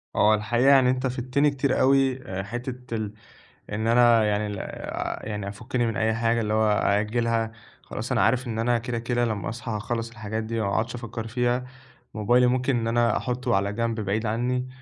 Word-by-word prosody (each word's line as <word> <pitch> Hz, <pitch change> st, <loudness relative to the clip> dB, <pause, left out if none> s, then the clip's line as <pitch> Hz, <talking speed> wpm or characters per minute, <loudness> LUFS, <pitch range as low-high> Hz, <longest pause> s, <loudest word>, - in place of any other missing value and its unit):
هو 105 Hz, +1 st, +5 dB
الحقيقة، 120 Hz, +5 st, +2 dB
يعني 135 Hz, -2 st, +6 dB
أنت 130 Hz, +1 st, 0 dB
فِدتني 130 Hz, +3 st, +1 dB
كتير 140 Hz, -1 st, 0 dB
أوي. 135 Hz, -1 st, +3 dB, 0.2 s
حتة 120 Hz, +3 st, -6 dB
ال 105 Hz, -2 st, -3 dB, 0.6 s
إن 110 Hz, +2 st, -2 dB
أنا 120 Hz, -1 st, +5 dB
يعني 105 Hz, 0 st, 0 dB
ال 100 Hz, -1 st, -5 dB
آآ، -, -, -5 dB
يعني، 105 Hz, -2 st, -4 dB
أفُكِّني 120 Hz, +4 st, -2 dB
من 115 Hz, +2 st, -2 dB
أي 110 Hz, -1 st, +1 dB
حاجة، 115 Hz, +1 st, +1 dB
اللي 105 Hz, -1 st, -1 dB
هو 110 Hz, 0 st, +3 dB
أأجِّلها، 110 Hz, +3 st, +1 dB, 0.3 s
خلاص -, -, -6 dB
أنا -, -, +2 dB
عارف 125 Hz, +2 st, +2 dB
إن 110 Hz, -1 st, -3 dB
أنا 120 Hz, +1 st, +2 dB
كده 115 Hz, 0 st, -3 dB
كده 120 Hz, +1 st, 0 dB
لمّا 105 Hz, -4 st, -2 dB
أصحى 115 Hz, 0 st, -6 dB
هاخلِّص 115 Hz, +2 st, -3 dB
الحاجات 110 Hz, -1 st, -4 dB
دي. 115 Hz, +1 st, -3 dB
وما 100 Hz, -, 0 dB
أقعدش 115 Hz, +2 st, -1 dB
أفكِّر 115 Hz, -1 st, -6 dB
فيها. 125 Hz, +2 st, 0 dB, 0.5 s
موبايلي، 120 Hz, +4 st, +3 dB
ممكن 130 Hz, +1 st, +1 dB
إن 115 Hz, -1 st, -1 dB
أنا 115 Hz, -1 st, +2 dB
أحُطَّه 125 Hz, -4 st, -1 dB
على 100 Hz, +1 st, 0 dB
جنب، 115 Hz, 0 st, -1 dB
بعيد 105 Hz, +2 st, -1 dB
عني. 125 Hz, +3 st, -1 dB
115 Hz, 190 wpm, -25 LUFS, 110-125 Hz, 0.6 s, يعني